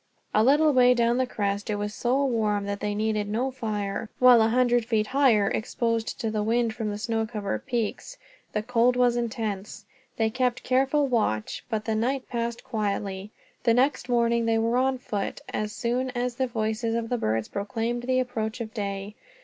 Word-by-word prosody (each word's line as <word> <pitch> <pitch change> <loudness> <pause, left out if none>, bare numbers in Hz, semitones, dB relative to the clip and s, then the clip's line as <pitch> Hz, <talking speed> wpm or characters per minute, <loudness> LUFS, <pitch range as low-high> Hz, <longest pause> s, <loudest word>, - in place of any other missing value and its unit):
A 215 - +4
little 295 +4 +4
way 250 -1 +6
down 235 0 +2
the 260 - +1
crest 200 -3 -2
it 210 - 0
was 205 0 -3
so 260 +5 +1
warm 215 -5 0
that 200 0 -3
they 205 0 -2
needed 215 -1 -1
no 245 +5 -1
fire, 215 -4 -3
while 250 -2 +7
a 220 - +4
hundred 245 0 +3
feet 220 -2 +1
higher, 240 -5 +3
exposed 230 +1 -1
to 225 -2 -1
the 215 -1 -1
wind 230 +1 +1
from 220 -2 -3
the 205 - -3
snow 225 0 -1
covered 210 -2 -4
peaks, 240 - -3 0.3
the 210 - -2
cold 245 +1 +3
was 245 -1 +3
intense. 215 -4 -3 0.3
They 220 -1 +1
kept 250 0 0
careful 270 +3 +2
watch, 210 - -1
but 220 -2 -2
the 220 - 0
night 255 +5 -1
passed 235 -1 -3
quietly. 200 -3 -3 0.3
The 230 -2 +3
next 255 0 +1
morning 235 -1 +2
they 225 0 +3
were 230 +2 +1
on 260 +1 +2
foot, 210 -5 -4
as 210 0 -2
soon 245 +4 -1
as 245 0 -1
the 260 - +1
voices 225 0 -1
of 230 -1 -2
the 245 - 0
birds 110 - 0
proclaimed 225 +4 -3
the 255 +1 +1
approach 225 -2 -2
of 220 -2 -6
day. 200 -2 -4
230 Hz, 190 wpm, -26 LUFS, 215-250 Hz, 0.3 s, while